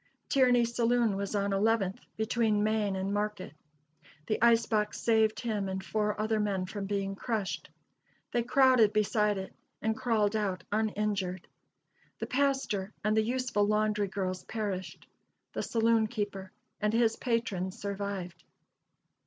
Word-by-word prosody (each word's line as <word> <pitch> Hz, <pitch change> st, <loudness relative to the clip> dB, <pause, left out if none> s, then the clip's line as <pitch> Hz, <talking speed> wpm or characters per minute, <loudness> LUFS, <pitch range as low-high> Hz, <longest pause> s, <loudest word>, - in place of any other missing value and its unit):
Tierney's 245 Hz, -3 st, +4 dB
saloon 235 Hz, -3 st, +2 dB
was 200 Hz, +1 st, -3 dB
on 200 Hz, 0 st, 0 dB
Eleventh, 200 Hz, -1 st, +1 dB, 0.2 s
between 220 Hz, -1 st, +1 dB
Main 215 Hz, -2 st, +1 dB
and 190 Hz, +1 st, -2 dB
Market. 205 Hz, -5 st, -2 dB, 0.7 s
The 215 Hz, -, -1 dB
ice 230 Hz, -1 st, +5 dB
box 210 Hz, -2 st, 0 dB
saved 220 Hz, -1 st, +2 dB
him 210 Hz, -5 st, -2 dB
and 190 Hz, 0 st, -4 dB
four 210 Hz, -1 st, -1 dB
other 215 Hz, 0 st, +1 dB
men 200 Hz, -3 st, 0 dB
from 195 Hz, +1 st, -5 dB
being 195 Hz, -1 st, -1 dB
crushed. 205 Hz, -5 st, -3 dB, 0.6 s
They 240 Hz, -, +1 dB
crowded 250 Hz, -3 st, +4 dB
beside 210 Hz, -1 st, +2 dB
it, 190 Hz, 0 st, -6 dB, 0.3 s
and 220 Hz, 0 st, 0 dB
crawled 220 Hz, -3 st, +1 dB
out 190 Hz, -4 st, -1 dB
uninjured. 205 Hz, -4 st, -1 dB, 0.7 s
The -, -, -3 dB
pastor 255 Hz, -8 st, 0 dB
and 215 Hz, +1 st, +2 dB
the 220 Hz, -, +4 dB
useful 240 Hz, -3 st, 0 dB
laundry 210 Hz, -1 st, +1 dB
girls 185 Hz, -1 st, -3 dB
perished; 190 Hz, -5 st, -4 dB, 0.5 s
the -, -, -2 dB
saloon 225 Hz, -1 st, +2 dB
keeper 205 Hz, -4 st, -4 dB, 0.3 s
and 210 Hz, 0 st, +1 dB
his 225 Hz, -1 st, +3 dB
patrons 205 Hz, -7 st, -1 dB
survived. 200 Hz, -3 st, -5 dB
210 Hz, 135 wpm, -30 LUFS, 195-225 Hz, 0.7 s, ice